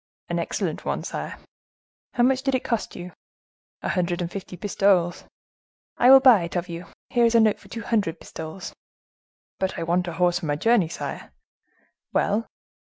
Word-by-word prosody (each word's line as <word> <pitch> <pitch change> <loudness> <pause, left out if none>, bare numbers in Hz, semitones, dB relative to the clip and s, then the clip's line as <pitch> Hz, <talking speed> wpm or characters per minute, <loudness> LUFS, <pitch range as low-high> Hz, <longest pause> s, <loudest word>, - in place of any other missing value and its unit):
"An - - -1
excellent - - -2
one, - - -2
sire." - - -5 0.8
"How 240 - +3
much 260 +1 +3
did 270 -1 0
it 255 - -1
cost 230 -3 -2
you?" 180 0 -7 0.7
"A - - -1
hundred 175 -2 0
and 175 -1 -3
fifty 190 -2 -7
pistoles." 185 -2 +1 0.7
"I 245 - +5
will 270 0 +10
buy 255 -7 +7
it 170 +1 -5
of 175 0 -1
you. 170 0 -7 0.2
Here 240 -2 +4
is 230 0 +2
a - - +7
note 220 -2 +3
for - - -17
two 230 -1 -7
hundred 200 -7 0
pistoles." 160 +4 -8 0.9
"But 190 0 -1
I 165 - -2
want 175 +2 0
a 170 - -4
horse 175 +1 +2
for 170 - -5
my 145 - +1
journey, 225 +2 +3
sire." 165 - -6 0.8
"Well!" 215 +3 +1
185 Hz, 180 wpm, -24 LUFS, 175-230 Hz, 0.9 s, will